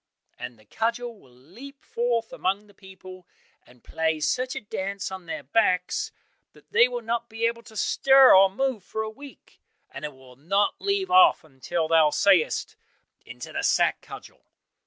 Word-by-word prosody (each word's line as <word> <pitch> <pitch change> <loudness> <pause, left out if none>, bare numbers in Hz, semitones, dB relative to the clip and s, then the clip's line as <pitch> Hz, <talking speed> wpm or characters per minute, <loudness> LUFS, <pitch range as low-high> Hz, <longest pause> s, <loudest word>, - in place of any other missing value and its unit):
and 120 - -8
the 110 - -23
cudgel 230 - -3
will 130 - -22
leap 205 - -14
forth 235 -1 -2
among 195 +3 -2
the 205 - -21
people, 185 -2 -14 0.4
and 125 -1 -21
play 160 -1 -1
such 250 +11 -1
a - - -3
dance 200 -2 -5
on 190 -2 -9
their 155 -3 -5
backs 180 +2 0 0.4
that - - -22
they 470 +1 +5
will - - -6
not 235 0 -3
be 225 +1 -2
able 235 0 -1
to 220 -1 -14
stir 270 +4 +5
or 195 0 +6
move 250 0 -2
for 220 +3 -4
a 220 - -5
week, 280 +5 -15 0.3
and - - -9
it 150 -2 -6
will 130 -1 -17
not 195 +9 0
leave 395 -2 -1
off 365 -1 +6
until 155 +3 -4
thou 160 -1 +4
sayest, 175 +2 +2 0.5
'Into - - -10
the - - -2
sack, - - +1
Cudgel! - - -12
200 Hz, 175 wpm, -25 LUFS, 160-235 Hz, 0.5 s, or